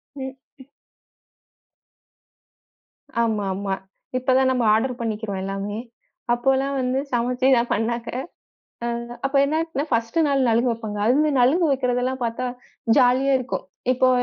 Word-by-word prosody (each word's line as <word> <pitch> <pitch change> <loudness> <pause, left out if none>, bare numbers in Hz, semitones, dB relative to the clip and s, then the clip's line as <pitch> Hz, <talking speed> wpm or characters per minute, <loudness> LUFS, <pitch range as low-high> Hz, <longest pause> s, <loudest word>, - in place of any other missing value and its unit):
ம், 265 -1 -6 0.2
ம். 265 - -13 2.6
ஆமா, 220 -3 0
ஆமா. 195 0 -2 0.4
இப்பதான் 260 +1 +3
நம்ம 250 -2 +1
ஆர்டர் 245 +3 0
பண்ணிக்கிறோம் 215 -4 -3
எல்லாமே. 195 +2 -3 0.5
அப்பல்லாம் 270 +3 +1
வந்து 255 +1 0
சமைச்சுதான் 245 0 +2
பண்ணாங்க. 235 +2 -1 0.8
அ - - 0 0.4
அப்ப 270 +1 -1
என்னா 310 +3 0
ஆச்சுன்னா 310 -4 -3
ஃபர்ஸ்ட் 230 +6 0
நாள் 275 -2 +2
நலுங்கு 235 +2 +3
வைப்பாங்க. 215 -2 -5
அதுலந்து 295 +6 +3
நலுங்கு 320 +8 +4
வைக்கிறது 250 -2 0
எல்லாம் 255 0 -2
பார்த்தா 235 +2 -2 0.5
ஜாலியா 260 +1 +4
இருக்கும். 255 0 -4 0.3
இப்போ 255 0 +3
250 Hz, 120 wpm, -23 LUFS, 230-265 Hz, 2.6 s, நலுங்கு